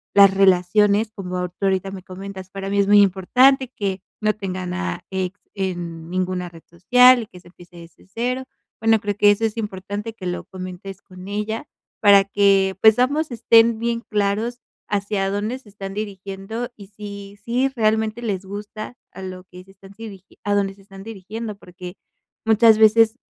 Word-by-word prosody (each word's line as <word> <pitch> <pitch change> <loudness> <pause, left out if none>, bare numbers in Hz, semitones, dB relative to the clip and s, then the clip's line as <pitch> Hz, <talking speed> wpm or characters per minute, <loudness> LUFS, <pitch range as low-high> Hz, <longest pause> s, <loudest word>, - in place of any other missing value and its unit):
las 200 -1 +8
relaciones, 200 +3 +3
como 180 -2 -4
tú 175 - -36
ahorita 190 0 0
me 190 -2 -8
comentas, 190 0 -9
para 195 0 -5
mí 200 - -1
es 200 - +4
muy 205 0 +7
importante 250 +8 +3
que 195 -2 -3 0.2
no 215 0 +2
tengan 185 -3 -4
a 185 -2 -4
ex 190 +1 -3 0.2
en 175 -4 -4
ninguna 185 -1 -2
red 165 -1 -15
social 250 +7 +5
y - - -12
que 180 - -14
se 175 - -20
empiece 175 0 -17
desde 170 +1 -15
cero. 250 +3 -2 0.4
Bueno, 225 0 +3
creo 205 -1 -3
que 205 0 +6
eso 215 +2 -1
es 220 0 -1
importante 205 +1 -5
que 190 -4 -7
lo 175 - -3
comentes 185 +1 -9
con 185 0 -13
ella, 210 +2 -4 0.3
para 200 -2 +6
que 195 -1 +3
pues 220 +2 +6
ambos 285 +3 +1
estén 230 -1 +4
bien 235 0 -1
claros, 215 +3 -1 0.3
hacia 200 -1 -1
dónde 210 +5 -2
se 260 -5 -18
están 195 -1 -8
dirigiendo 200 +2 -5
y 200 -2 -13
si 200 -1 -9
si 250 +3 +1
realmente 220 -2 0
les 200 -5 -3
gusta 210 +4 -7 0.2
a 190 - -9
lo 185 0 -8
que 180 0 -13
se 190 - -19
están 195 +1 -17
sirig 205 -4 -10 0.2
a 205 0 0
dónde 195 -1 0
se 195 - -20
están 195 0 -12
dirigiendo, 215 +1 -7
porque 180 -1 -11 0.5
muchas 225 0 +5
veces 220 +1 +5
200 Hz, 180 wpm, -21 LUFS, 190-220 Hz, 0.5 s, las